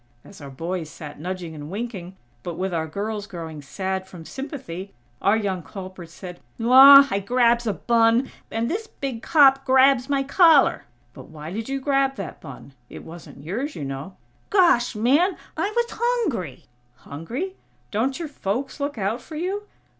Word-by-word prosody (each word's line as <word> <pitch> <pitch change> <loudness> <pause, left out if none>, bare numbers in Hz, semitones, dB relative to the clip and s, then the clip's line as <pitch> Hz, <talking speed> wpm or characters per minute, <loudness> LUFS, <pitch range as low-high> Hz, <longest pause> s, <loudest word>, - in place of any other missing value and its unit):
As 200 - -14
our 140 - -8
boys 165 +4 -4
sat 150 -2 -10
nudging 180 0 -5
and 150 -1 -8
winking, 195 -3 -6 0.3
but 170 +4 -6
with 190 0 -2
our 160 -1 -1
girls 205 +4 -4
growing 165 -5 -7
sad 190 +6 -4
from 175 -4 -11
sympathy, 255 - -7 0.3
our 200 +3 +3
young 195 -4 -2
culprit 185 +1 -9
said: 180 +1 -10 0.2
"Aw! 270 +4 +9
I 195 - +1
grabs 235 +2 +2
a 210 - +1
bun, 230 +3 +2 0.2
and 225 +1 -2
dis 435 - -3
big 265 - -6
cop 275 -3 +5
grabs 265 0 +4
my 275 -1 +1
collar!" 310 0 +4 0.3
"But - - -11
why 155 +1 -9
did 225 +4 -5
you 275 0 -2
grab 275 0 +1
that 195 -5 -7
bun? 140 +1 -11 0.2
It - - -10
wasn't 160 -4 -12
yours, 245 - -4
you 145 - -5
know." 135 +7 -6 0.3
"Gosh, 340 - +3
man!! 285 - +2 0.2
I 395 - -1
was 475 0 +2
hungry!!" 420 - -2 0.3
"Hungry? 230 - -6 0.4
Don't 250 +6 0
your 335 - -4
folks 270 +1 -4
look 285 -2 -3
out 215 +4 -2
for 315 - -11
you?" 385 +6 -3
225 Hz, 170 wpm, -23 LUFS, 180-275 Hz, 0.4 s, Aw